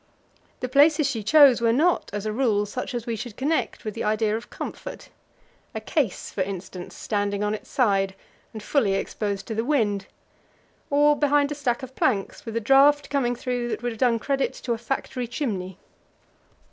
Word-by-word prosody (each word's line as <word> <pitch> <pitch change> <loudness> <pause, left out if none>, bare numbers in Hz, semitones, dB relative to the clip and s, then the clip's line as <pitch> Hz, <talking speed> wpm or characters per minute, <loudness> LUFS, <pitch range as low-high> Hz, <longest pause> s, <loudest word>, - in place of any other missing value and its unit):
The 255 - -1
places 290 +4 +4
she 245 -5 -2
chose 265 +2 +6
were 230 -1 +3
not, 320 +9 +2
as 205 0 -4
a 215 - -1
rule, 215 -4 +1
such 250 +5 -5
as 235 -1 -3
we 235 - -2
should 220 0 -7
connect 295 -2 -1
with 215 - -3
the - - -4
idea 215 0 +1
of 230 +2 -6
comfort; - - -7 0.7
a - - -1
case, 225 - -2
for 195 - -3
instance, 185 -1 -5
standing 205 -1 -1
on 210 0 0
its 215 - -7
side, 195 -7 +1 0.4
and 215 -2 -8
fully 215 -7 +2
exposed 200 0 -3
to 225 - -4
the 225 +1 -1
wind, 215 -8 0 0.8
or 295 +1 +4
behind 290 0 +2
a - - 0
stack 260 -3 -1
of 260 0 -9
planks, 210 -2 -1
with 225 - -5
a - - +2
draught 275 +5 +4
coming 245 -4 +1
through 245 0 -2
that 235 - -4
would 245 - -1
have 225 - -9
done 240 -2 +3
credit 275 +3 -1
to 240 - -3
a 230 - -4
factory 250 0 -3
chimney. 195 - -3
235 Hz, 190 wpm, -25 LUFS, 210-275 Hz, 0.8 s, chose